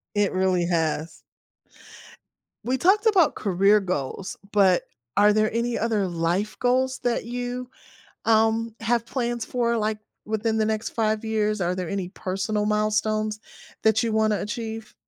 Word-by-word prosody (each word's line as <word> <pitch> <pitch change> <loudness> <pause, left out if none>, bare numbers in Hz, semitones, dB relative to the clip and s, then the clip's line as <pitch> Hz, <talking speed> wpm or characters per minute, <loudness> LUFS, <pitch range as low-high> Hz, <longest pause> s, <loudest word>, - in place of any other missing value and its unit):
It 205 -1 +2
really 185 -2 +1
has. 160 -2 -1 1.4
We 255 +1 0
talked 410 - +3
about 390 -8 +4
career 200 +2 +3
goals, 185 0 -4
but 190 -3 +4 0.3
are 210 +1 +6
there 215 +1 +1
any 235 0 0
other 215 -4 0
life 175 +5 -1
goals 260 +1 +1
that 245 -1 0
you, 245 +1 -4 0.6
um, 225 0 +2
have 230 +1 +1
plans 240 -2 -2
for, 235 -1 0
like, 215 0 -1 0.3
within 220 +1 -1
the 215 - +2
next 220 0 -1
5 220 -1 -1
years? 215 -1 0
Are 180 0 0
there 180 -2 -4
any 190 -3 -3
personal 205 +3 -2
milestones 215 0 0 0.4
that 220 +1 +3
you 230 - 0
wanna 215 -1 +2
achieve? 225 +1 -5
215 Hz, 145 wpm, -24 LUFS, 200-230 Hz, 1.4 s, are